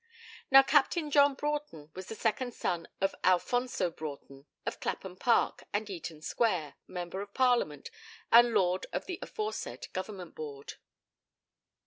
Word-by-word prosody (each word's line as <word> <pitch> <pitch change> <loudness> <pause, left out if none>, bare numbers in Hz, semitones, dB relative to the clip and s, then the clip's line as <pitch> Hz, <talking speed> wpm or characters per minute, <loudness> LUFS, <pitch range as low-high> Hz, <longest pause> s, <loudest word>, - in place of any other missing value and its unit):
Now 270 0 +9
Captain 295 +2 +2
John 285 -1 +5
Broughton 290 - -4
was 185 0 -8
the 225 - -6
second 235 +3 -1
son 170 -1 -2
of 195 0 +1
Alfonso 185 +2 +2
Broughton, 140 -2 -8 0.2
of - - -3
Clapham 190 -2 -4
Park 230 +5 +2
and 210 +1 -1
Eaton 165 -3 -7
Square, 180 -11 0
Member 180 +1 -5
of 200 0 -9
Parliament, 245 - +2 0.4
and 240 +1 +8
Lord 185 -4 +1
of - - -2
the 365 -1 -5
aforesaid 430 0 -5
Government 185 -2 -5
Board. 145 -3 -7
200 Hz, 135 wpm, -31 LUFS, 170-255 Hz, 0.4 s, Now